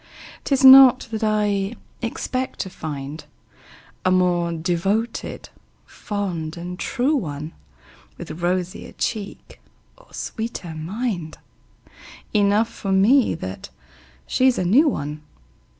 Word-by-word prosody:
'Tis 275 -1 +2
not 260 -1 +9
that 220 0 -3
I 210 0 0 0.3
expect 255 +2 -3
to 190 - -6
find 145 -1 -6 0.8
A 185 - +2
more 180 -2 +2
devoted, 185 +7 -2 0.4
fond 180 -7 -4
and 180 +2 -7
true 270 +4 0
one, 155 - -4 0.6
With 160 +3 -8
rosier 180 +1 -2
cheek 210 -3 -5 0.3
or - - -23
sweeter 220 -7 -5
mind 175 0 -4 1.0
Enough 210 +2 +3
for 200 -3 -5
me 220 +6 +4
that 95 - -7 0.6
she's 260 -1 +2
a 185 - -1
new 260 - +5
one. 150 - -4
195 Hz, 105 wpm, -22 LUFS, 170-230 Hz, 1.0 s, not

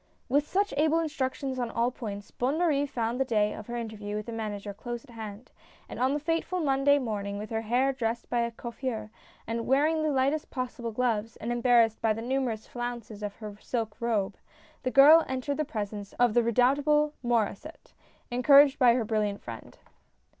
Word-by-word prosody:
With 285 +3 +2
such 400 +1 0
able 310 +2 +3
instructions 275 -4 -2
on 240 -2 -1
all 235 +2 0
points, 205 -5 -7
Bonne 265 +5 -1
Marie 295 -5 +2
found 235 -2 -2
the - - +4
day 210 -4 +1
of 215 - -9
her 240 - -5
interview 215 -3 -5
with 210 0 -4
the 235 - -6
Manager 210 -2 -5
close 240 +3 -6
at 265 - -17
hand; 220 0 -9 0.4
and - - -8
on 260 +3 +2
the - - -1
fateful 330 +4 -1
Monday 285 -2 +3
morning, 205 -6 -3
with 210 +2 -7
her 225 0 -1
hair 250 +5 +1
dressed 235 -2 -3
by 240 - 0
a 235 0 +1
coiffeur, 230 -2 -5 0.3
and 230 0 -3
wearing 300 +4 +3
the 310 - +1
lightest 280 +2 0
possible 250 -3 -4
gloves, 225 -2 -1
and 230 - -4
embarrassed 240 -2 +3
by 220 -1 +2
the 225 - -6
numer 260 0 0
ous 215 0 -10
flounces 240 -3 -6
of 205 -1 -4
her 210 -2 -8
silk 225 -4 -3
robe, 220 -5 -1 0.4
the 255 - -1
girl 295 +5 +8
entered 265 +2 -2
the 305 - 0
presence 205 -6 -5
of 245 -2 +2
the 240 - +4
redoubtable 280 +6 +3
Maur^sset, 240 +5 -2 0.4
encouraged 275 +3 +6
by 245 -3 +6
her 240 -3 0
brilliant 210 -2 -1
friend. 115 -2 -9
240 Hz, 190 wpm, -28 LUFS, 220-275 Hz, 0.4 s, girl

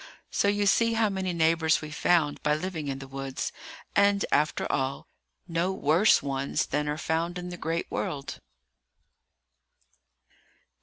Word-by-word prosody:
So - - +1
you 205 0 +2
see 230 +3 +3
how 225 -1 +2
many 190 -2 -2
neighbours 160 -1 +3
we 155 -1 -8
found 155 -1 +2
by 150 0 +2
living 160 -2 -4
in 135 -1 -2
the 135 0 -9
woods, 135 0 -4 0.4
and, 200 0 +4
after 150 +2 +1
all, 135 0 -1 0.4
no 170 +2 0
worse 180 +3 +3
ones 135 0 -1
than 150 +1 -1
are 150 - -2
found 165 +3 -1
in 180 0 -5
the 175 - -6
great 165 0 -2
world. 140 -1 -4
165 Hz, 145 wpm, -27 LUFS, 145-185 Hz, 0.4 s, and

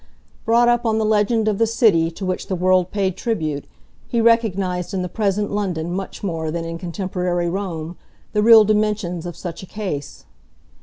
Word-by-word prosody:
Brought 235 +1 +4
up 240 0 +3
on 220 -2 +1
the 220 - +1
legend 215 +1 +2
of 210 -2 0
the 225 - +3
City 205 -8 +3
to 190 +4 -7
which 185 0 -3
the 190 - -1
world 185 0 +2
paid 190 -3 -1
tribute, 155 - -2 0.4
he 235 - -1
recognised 200 -5 +1
in 185 - -1
the - - -2
present 205 +1 -1
London 180 -5 -2
much 190 +3 -5
more 165 -5 -2
than 165 +1 -3
in 165 0 -5
contemporary 180 -1 -2
Rome 175 -3 -4 0.4
the 210 - +2
real 225 0 +8
dimensions 210 -5 0
of 175 -1 -7
such 175 -2 -6
a 190 - -10
case. 175 -10 -6
190 Hz, 185 wpm, -21 LUFS, 175-215 Hz, 0.4 s, real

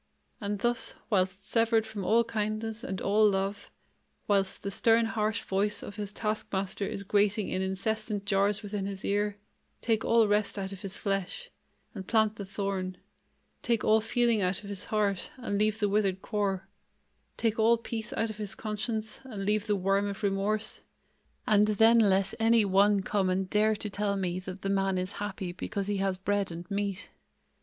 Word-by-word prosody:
And 205 0 -2
thus, 240 +3 -1 0.2
whilst 190 0 +1
severed 225 -1 +2
from 205 -3 -5
all 225 +6 +4
kindness 220 0 -3
and 190 0 -4
all 210 +2 +4
love, 200 +1 -2 0.6
whilst 195 -2 +1
the 200 - -3
stern 225 +3 +3
harsh 215 -1 -1
voice 200 +2 0
of 205 - -8
his 205 -1 -4
task 215 0 -2
master 195 +1 -2
is 200 - -4
grating 205 +1 +2
in 185 - -1
incessant 205 +2 -2
jars 200 +1 +2
within 205 -1 -3
his 195 -1 -6
ear, 205 0 0 0.4
take 225 -2 0
all 230 -1 +4
rest 205 0 +1
out 190 -1 -3
of 195 -1 -8
his 195 -2 -4
flesh, 200 - -3 0.4
and 190 -4 -7
plant 220 -1 +2
the 200 - -5
thorn; 190 -2 -3 0.6
take 235 -3 0
all 220 0 +4
feeling 235 -1 +2
out 185 +2 -1
of 200 - -8
his 200 -1 -4
heart, 205 -3 0
and 205 -5 -2
leave 215 0 +2
the 210 - +2
withered 195 -2 +1
core; 195 -3 -1 0.7
take 225 -1 0
all 230 +2 +5
peace 225 -1 -5
out 225 -1 -1
of 210 - -10
his 210 0 -3
conscience, 215 0 -3
and 210 -7 -5
leave 210 +1 +1
the 210 - +2
worm 195 +1 +1
of 200 +1 -6
remorse; 200 +2 -1 0.6
and 210 0 +4
then 225 +2 +5
let 195 -2 +3
any 225 -1 +4
one 200 +1 +4
come 195 -1 +1
and 185 0 -1
dare 215 +1 +3
to 210 - -5
tell 200 0 -1
me 180 -2 -1
that 185 +1 -8
the - - -1
man 195 -1 +1
is 185 +1 -2
happy 195 -3 -3
because 195 +2 -4
he 205 0 -1
has 195 -1 0
bread 200 0 0
and 170 +2 -8
meat. 200 -1 -3
205 Hz, 185 wpm, -29 LUFS, 195-215 Hz, 0.7 s, all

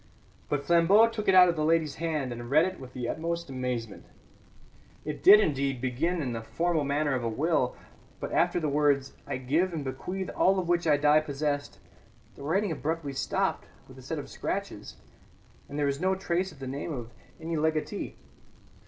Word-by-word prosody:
But 145 -1 -1
Flambeau 175 +7 +5
took 225 -2 -5
it 190 - +5
out 180 -1 +9
of 170 - +1
the 155 - -1
lady's 160 -1 +1
hand, 155 -6 -2
and 120 0 -8
read 155 +5 +5
it 185 0 -5
with 130 -1 -11
the 125 -2 -4
utmost 170 0 -3
amazement. 125 -5 -4 1.0
It 150 -1 -5
did, 205 +2 +9
indeed, 140 - 0
begin 150 +7 -1
in 125 -3 -3
the 115 - -4
formal 165 +6 0
manner 145 +1 0
of 125 -2 -1
a 115 - 0
will, 135 +1 0 0.4
but - - -5
after - - +2
the 155 - -1
words 145 -2 +1
"I - - -2
give 155 +8 0
and 150 -3 -4
bequeath 180 +8 -4
all 195 +1 +3
of 180 -2 -1
which 175 -1 +1
I 150 -2 +5
die 150 +1 +5
possessed" 145 -1 -3 0.6
the - - -13
writing 185 +7 0
abruptly 155 -1 -3
stopped - - -1 0.2
with - - -14
a - - -11
set - - -5
of - - -6
scratches, - - -5 0.7
and 145 - -6
there 145 - +1
was 140 +2 -1
no 190 +1 +2
trace 185 0 -1
of - - -16
the 135 - -7
name 140 +5 -4
of 120 -5 -6 0.3
any 165 +1 -4
legatee. 155 0 -1
150 Hz, 195 wpm, -28 LUFS, 135-170 Hz, 1.0 s, out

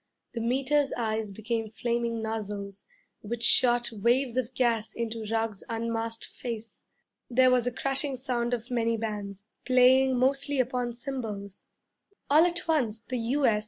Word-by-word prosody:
The 230 - -3
Meter's 270 +4 +1
eyes 220 -2 -1
became 220 +2 -3
flaming 235 0 -2
nozzles, 205 -3 -5 0.3
which 230 +2 -5
shot 240 -1 +4
waves 235 +4 +1
of 255 -1 -2
gas 235 -4 +1
into 230 -1 -4
Ruggs's 225 -3 -1
unmasked 230 0 -2
face. 230 -2 -7 0.4
There 255 +1 +5
was 250 -1 +3
a - - +1
crashing 275 +3 -1
sound 245 -2 -1
of 240 +2 -10
many 230 -1 +1
bands, 205 -2 -5 0.2
playing 255 +1 +5
mostly 275 +2 +1
upon 250 -1 0
cymbals. 225 -6 -6 0.6
All 310 +3 +7
at 345 -1 -3
once 250 -9 +1
the 250 +2 -4
'U.S.' 235 -2 +2
235 Hz, 140 wpm, -28 LUFS, 225-255 Hz, 0.6 s, All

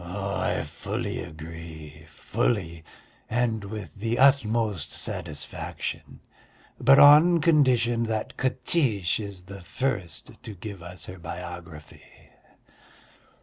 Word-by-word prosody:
"I 100 +3 -2
fully - - -4
agree, 80 -1 -9
fully, 85 -8 -2 0.5
and 115 -2 0
with 100 -5 -7
the 115 +3 -2
utmost 110 - +3
satisfaction, 75 -3 -5 0.6
but 135 0 +6
on 155 +5 +8
condition 130 -8 +3
that 110 -1 -3
Katiche 125 - +1
is 100 -4 -7
the 100 +1 -10
first 90 -5 -3
to 110 - -8
give 100 0 -8
us 90 0 -8
her 90 0 -9
biography." 85 -2 -9
100 Hz, 100 wpm, -26 LUFS, 85-120 Hz, 0.6 s, on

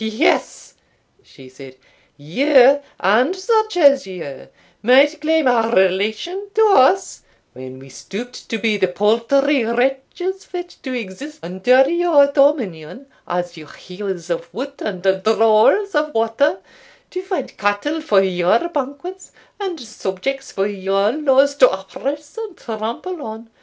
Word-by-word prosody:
"Yes," 220 +9 -1 0.5
she 135 - -17
said, 130 0 -13 0.4
"you, 265 - +4 0.2
and 240 - +2
such 435 0 0
as 280 - +4
you, 165 -8 -8 0.3
might 280 +6 +4
claim 320 0 +1
a 235 -3 +2
relation 210 - 0
to 440 0 +5
us, 375 +3 +3 0.3
when 130 0 -10
we 135 +1 -14
stooped 240 - -9
to 225 - -2
be 215 0 0
the 190 - +1
paltry 230 +8 +1
wretches 270 - -2
fit 355 -1 -8
to 260 - -6
exist 255 +7 -7
under 245 +10 +3
your 340 -3 +4
dominion, 260 - 0 0.2
as 175 0 -3
your 155 -2 -12
hewers 180 -2 -7
of 170 0 -4
wood 275 +4 -6
and 185 -4 -5 0.2
drawers 225 - +3
of 300 -2 -1
water 225 +6 +1 0.5
to 365 - -4
find 375 0 -5
cattle 205 +11 -1
for 205 -11 +3
your 185 - +1
banquets, 300 +5 -6 0.3
and 375 -5 -4
subjects 245 +3 -5
for 195 - -1
your 195 0 0
laws 280 0 +2
to 255 -3 +7
oppress 280 - -6
and 430 -6 -7
trample 230 +10 -5
on. 225 -2 -9
250 Hz, 135 wpm, -19 LUFS, 195-300 Hz, 0.5 s, to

